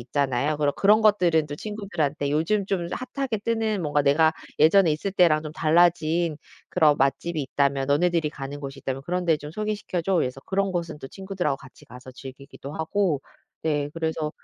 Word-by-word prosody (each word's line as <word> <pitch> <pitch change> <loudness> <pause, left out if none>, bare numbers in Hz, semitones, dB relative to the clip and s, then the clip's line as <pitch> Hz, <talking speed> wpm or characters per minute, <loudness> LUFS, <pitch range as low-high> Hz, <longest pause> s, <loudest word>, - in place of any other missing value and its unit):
있잖아요. 140 +3 0
그런 145 -1 +1
그런 210 +2 +4
것들은 175 -7 +3
또 145 - -6
친구들한테 165 -8 -3
"요즘 165 +8 +1
좀 180 -4 -1 0.3
핫하게 270 -6 -1
뜨는 220 -2 -1
뭔가 150 -1 +1
내가 155 +3 +4 0.3
예전에 165 +3 +5
있을 155 +6 -2
때랑 165 -5 +4
좀 155 -1 -7
달라진 165 0 +2 0.3
그런 155 -5 +4
맛집이 150 +4 0
있다면 140 0 0
너네들이 165 +1 +2
가는 140 -1 -7
곳이 135 0 -7
있다면 135 0 -4
그런 180 +2 -2
데 160 -2 +4
좀 150 0 -9
소개시켜 210 -2 -3
줘." 190 +3 0
그래서 130 -4 -1
그런 195 0 0
곳은 170 -3 -3
또 135 - -9
친구들하고 190 -7 -3
같이 130 -2 -16
가서 125 +1 -12
즐기기도 135 +2 -10
하고 160 -2 0 0.4
네 145 -2 0
그래서 160 -2 -2
160 Hz, 395 characters per minute, -25 LUFS, 145-185 Hz, 0.4 s, 예전에